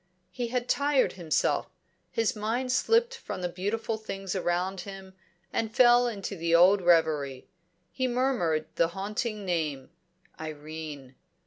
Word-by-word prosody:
He 245 -2 -3
had 245 +1 -2
tired 285 -2 +2
himself; 170 -4 0 0.4
his 225 -1 0
mind 230 +5 -1
slipped 465 - +2
from 470 - -6
the - - +1
beautiful 205 +5 -2
things 195 -3 -5
around 180 +1 -1
him, 195 0 -9 0.4
and 220 -1 -2
fell 245 0 +6
into 200 -3 -4
the 170 -1 +1
old 185 +4 +6
reverie. 155 -6 +2 0.4
He 260 -1 -1
murmured 240 -12 +1
the 170 - +4
haunting 210 +1 -3
name 155 -6 -2 0.5
Irene. 155 -3 -7
195 Hz, 130 wpm, -28 LUFS, 165-235 Hz, 0.5 s, fell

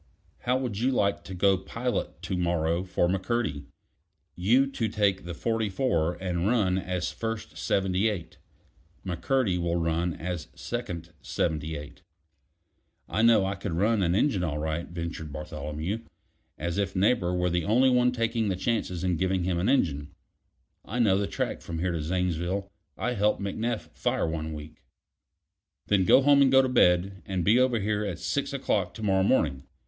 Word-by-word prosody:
"How 125 +1 +1
would 120 -6 -3
you 125 +3 +2
like 100 -6 +1
to 95 - -7
go 95 +1 +3
pilot 115 +6 -3
to 95 - -2
morrow 85 -1 0
for 90 -2 +1
McCurdy? 95 -5 -1 0.7
You 115 +10 +4
to 135 -4 -2
take 100 -4 +1
the 85 -1 -5
44 105 -6 0
and 90 -1 -2
run 100 -5 +2
as 90 -1 -2
first 115 -1 -5
Seventy 95 +2 +1
eight. 90 -7 -6 0.7
McCurdy 95 +2 0
will 85 0 0
run 85 0 0
as 90 -1 -4
second 90 -9 -5
Seventy 80 -1 -2
eight." 75 0 -9 1.1
"I 105 - 0
know 115 -4 +5
I 95 - -1
could 100 -2 -5
run 105 +5 +2
an 85 -1 +2
engine 105 -5 +2
all 75 -4 -1
right," 80 +2 -2
ventured 85 -2 -5
Bartholomew, 75 +6 -4 0.6
as 85 +4 -2
if 100 -1 -1
Neighbor 95 -2 +2
were 90 0 +1
the 85 0 0
only 125 +6 +4
one 125 0 +4
taking 115 -2 0
the 95 - 0
chances 95 -3 -1
in 90 -2 +1
giving 95 0 0
him 90 -1 0
an 95 +7 +1
engine. 75 - +1 0.7
"I 110 - -5
know 110 -6 +4
the 100 0 0
track - - -3
from 85 - -6
here 90 +2 0
to 85 -2 -2
Zanesville. 90 +3 -1 0.3
I 125 - -1
helped 105 -1 +1
McNeff 100 -4 -3
fire 75 - 0
one 80 -1 -3
week." 75 0 -10 1.0
"Then 100 -3 +2
go 130 - +6
home, 140 0 +6
and 135 -1 +5
go 135 0 +6
to 130 - 0
bed; 95 -5 +3
and 95 -3 -1
be 115 +5 +5
over 130 -3 +3
here 105 +1 0
at 95 -4 -3
six 140 - -2
o'clock 105 -9 -1
to 110 - -7
morrow 95 -2 +3
morning. 80 - +2
95 Hz, 175 wpm, -27 LUFS, 85-110 Hz, 1.1 s, go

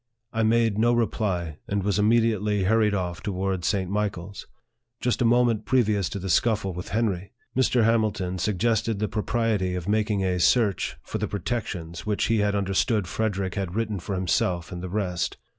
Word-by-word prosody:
I 115 - 0
made 110 -1 +2
no 120 +2 +4
reply, 95 -9 -1
and 100 -1 -1
was 100 +1 +1
immediately 105 -2 +2
hurried 105 +1 +3
off 90 -3 -3
to 105 - -3
wards 95 -1 -1
St. 95 -3 0
Michael's. 100 -1 -3 0.5
Just 125 +1 0
a - - +3
moment 120 -2 +3
previous 105 -8 +2
to - - -5
the 95 0 -5
scuffle 100 0 +1
with 90 +1 -7
Henry, 100 -1 -1 0.2
Mr. 125 -2 +3
Hamilton 105 -5 +1
suggested 110 +3 +1
the 105 +1 -1
pro 105 - -2
priety 105 -6 0
of 90 0 -6
making 105 -1 +1
a 90 -1 0
search 105 +1 +2
for - - -4
the - - -1
protections 90 -5 -4
which 105 -1 -1
he 115 -1 +3
had 105 0 +1
understood 100 +2 +1
Frederick 100 -1 -2
had 95 -3 -3
written 110 -3 -1
for 95 +3 -4
himself 90 -1 0
and 90 -1 -6
the 95 - -5
rest. 90 -3 -2
105 Hz, 180 wpm, -25 LUFS, 95-110 Hz, 0.5 s, no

